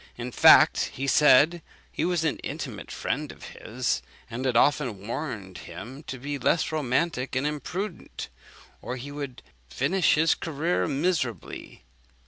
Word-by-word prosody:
In 120 +1 -5
fact, - - +7
he 135 - -3
said 150 +4 +5 0.3
he - - -2
was 175 -2 +1
an 160 - 0
intimate - - -6
friend - - -3
of - - -15
his, 120 - -2 0.3
and 125 +3 -4
had 125 -3 +2
often 120 -8 +2
warned 110 - -5
him 125 +9 -9
to 130 0 -5
be 140 +2 -4
less 160 - +1
romantic 135 -2 -1
and 130 +2 0
imprudent, 160 +6 -4 0.5
or 125 - -4
he 130 +3 -7
would 140 -3 -7 0.3
finish 155 - +2
his 160 +2 +4
career 165 +2 -1
miserably. 145 - -2
140 Hz, 140 wpm, -26 LUFS, 125-155 Hz, 0.5 s, fact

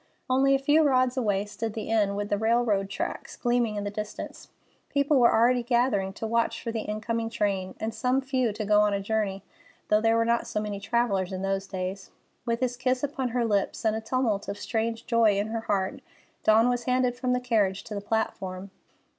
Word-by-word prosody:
Only 270 +1 +4
a - - +4
few 290 +4 +3
rods 255 -4 +3
away 205 -6 0
stood 220 +1 -5
the 220 -1 -5
inn, 205 -3 +2
with 205 0 -3
the 205 - +1
railroad 220 -3 +1
tracks - - -5
gleaming 240 -3 +1
in 205 - -3
the 205 - -3
distance. 210 0 -6 0.4
People 280 0 +2
were 240 - +6
already 245 +2 +4
gathering 235 -5 +1
to 225 - -5
watch 230 +1 0
for 230 - -2
the 225 - -2
incoming 225 +2 -3
train; 195 -4 -1
and 220 +1 -3
some 250 +4 +1
few 260 -3 0
to 215 +1 -4
go 210 0 +4
a 205 -1 +1
journey, 200 -1 -2 0.5
though 210 0 +4
there 225 0 +3
were 230 - +2
not 235 0 +1
so 235 -2 -2
many 210 -1 -4
travellers 200 -3 0
in 190 0 -4
those 195 0 -1
days. 190 0 -5 0.4
With 235 +1 0
his 245 -1 -1
kiss 255 +1 0
upon 275 -2 -1
her 240 0 0
lips 205 0 -1
and 220 0 +2
a 220 - -3
tumult 225 -3 -1
of 200 - -4
strange 225 +1 -2
joy 230 -4 +3
in 205 +2 -1
her 225 0 -2
heart, 195 -4 -1 0.4
Dawn 220 +2 +5
was 245 -1 0
handed 250 -1 +1
from 250 0 -1
the 250 - +1
carriage 210 -6 +1
to 225 - -8
the 200 - -3
platform. 195 -3 -3
225 Hz, 210 wpm, -27 LUFS, 205-245 Hz, 0.5 s, were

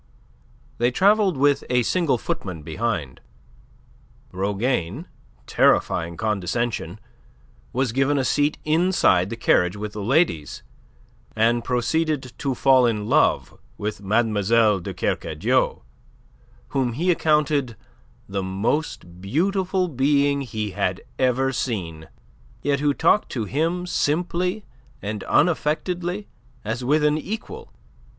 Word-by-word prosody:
They 120 +1 +3
travelled 195 - +3
with 145 +1 +3
a 125 -1 +2
single 165 -3 +1
footman 90 -7 -5
behind. 80 - -3 1.1
Rougane 100 - -2 0.4
terrifying 85 0 +2
condescension 105 -1 -2 0.7
was 130 -1 0
given 135 +4 +1
a 135 - 0
seat 145 +3 +1
inside 155 - +3
the 115 - -4
carriage 90 -5 +2
with 105 0 -5
the 105 - -5
ladies, 120 - 0 0.7
and 115 +2 +2
proceeded 130 +1 -1
to 135 -2 -1
fall 130 -1 +4
in 105 -3 -1
love - - +1 0.2
with 105 0 -4
Mlle. 110 0 +2
de 85 - -6
Kercadiou, - - -1 0.9
whom 130 -4 0
he 175 +9 +1
accounted 150 -6 +1 0.5
the 100 0 -3
most 95 - -3
beautiful 185 - 0
being 140 0 +2
he 110 -5 -4
had 95 -2 -2 0.2
ever 130 +1 +1
seen, 85 -11 -4 0.6
yet 140 0 +1
who 145 0 +2
talked 170 +6 +2
to 115 -4 -2
him 165 - -1
simply 180 +5 -1 0.3
and 105 0 -5
unaffectedly 175 +4 0 0.4
as 110 +4 -3
with 150 +4 +2
an 150 +1 +2
equal. 215 +7 -7
125 Hz, 115 wpm, -23 LUFS, 105-155 Hz, 1.1 s, fall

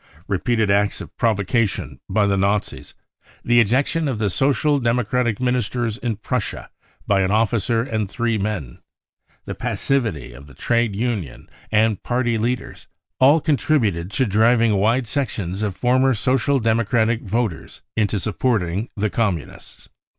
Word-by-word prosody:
Repeated 105 +2 +1
acts 100 +1 +1
of - - -10
provocation 110 -1 0
by 105 -2 +2
the 100 -1 +2
Nazis, 100 +1 -1 0.5
the 120 0 +4
I - - +8
ejection 140 +8 +1
of 130 -5 -2
the 105 -2 0
Social 140 +5 +2
Democratic 120 -1 0
ministers 125 -2 -1
in 120 -2 -2
Prussia 105 - -4 0.3
by 100 -1 +2
an 95 - +1
officer 115 +2 +1
and 110 -5 -2
"three 115 0 -1
men, 95 - -4 0.7
the - - -5
passivity 110 - -2
of 70 +4 -13
the 70 - -16
trade 115 -3 0
union 105 - -3 0.2
and 110 -1 +2
party 120 -2 0
leaders, 120 +2 -3 0.3
all 140 +5 +6
contributed 125 - 0
to 130 - +2
driving 115 +2 +3
wide 115 +6 +2
sections 110 - -3
of 105 -3 -2
former 130 +2 +2
Social 130 +4 +1
Democratic 115 0 +1
voters 115 - -3
into 105 -1 +1
supporting 105 -1 -1
the 105 0 0
Com 110 -6 +1
munists. 75 - -13
115 Hz, 145 wpm, -21 LUFS, 100-125 Hz, 0.7 s, I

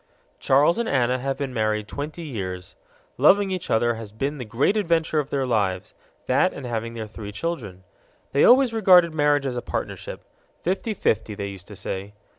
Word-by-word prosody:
Charles 145 - +3
and 235 - -1
Anna 130 -1 +1
have 135 +1 -2
been 135 -2 -4
married 110 -2 0
twenty 150 - -6
years. 95 - -6 0.4
Loving 200 -1 +5
each 185 -1 -4
other 120 +1 +2
has 110 -2 -8
been 135 +7 -3
the 125 - -5
great 125 - +1
adventure 165 -6 +1
of 145 -1 -3
their 135 -2 -1
lives 100 -7 -1 0.3
that - - +3
and 140 - -8
having 115 -1 -4
their 110 -1 -4
three 105 -1 -8
children. 105 - -5 0.5
They 140 - +3
always 255 -1 +6
regarded 180 -6 +5
marriage 145 -2 +2
as 125 -2 -2
a - - -2
partnership - - -5 0.4
fifty 195 +4 -1
fifty, 110 - 0
they 100 0 -4
used 95 -3 -11
to 105 - -10
say. 95 +2 -5
130 Hz, 185 wpm, -24 LUFS, 110-165 Hz, 0.5 s, always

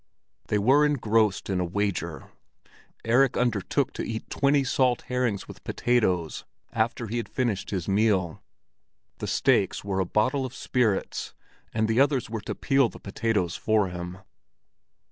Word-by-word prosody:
They 105 - +1
were 130 +8 +4
engrossed 115 -8 +2
in 95 -2 -1
a - - +1
wager; 90 -3 -3 0.7
Erik 125 +3 +3
undertook 115 -6 0
to - - -4
eat 110 -1 -5
twenty 140 0 +3
salt 130 -2 +1
herrings 125 -5 -1
with - - -12
potatoes 95 -10 0 0.3
after 115 +1 0
he 115 +2 -3
had 115 - -4
finished 115 -7 -1
his 95 -4 -3
meal. 95 -4 +1 0.8
The - - -4
stakes - - +2
were 100 -1 -2
a 95 - +1
bottle 130 +9 +1
of 130 -1 -6
spirits, 120 -6 -1 0.4
and 110 0 0
the 115 +2 +1
others 135 -5 +2
were 110 -2 -3
to - - -5
peel 135 -4 +2
the - - -12
potatoes 100 -3 -1
for 110 -3 +1
him. 90 0 -6
110 Hz, 150 wpm, -26 LUFS, 95-125 Hz, 0.8 s, were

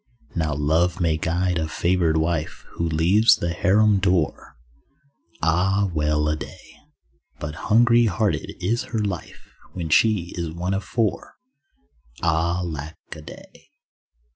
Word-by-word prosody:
Now 80 -3 -1
love 80 +5 +1
may 85 -3 +1
guard 85 +2 0
a 80 - -1
favoured 85 -1 +1
wife 80 0 -2
Who 85 0 -2
leaves 90 +8 +4
the 85 - -3
harem 100 +3 +3
door; 90 -6 -1 0.9
(Ah, 95 +4 +2
well 75 -1 +1
a 75 - +1
day) - - -11 0.6
But 75 +1 -5 0.2
hungry 120 +1 +5
hearted 105 +1 -1
is 120 +2 0
her 115 - -3
life 95 -5 -6 0.2
When 85 -3 -4
she 95 0 +2
is 85 -2 -3
one 90 +3 -2
of 95 +1 -2
four. 110 +3 -2 0.9
(Ah, 85 +2 +1
lack 80 -1 -6 0.2
a 80 - -10
day.) 75 - -14
85 Hz, 135 wpm, -23 LUFS, 80-95 Hz, 0.9 s, hungry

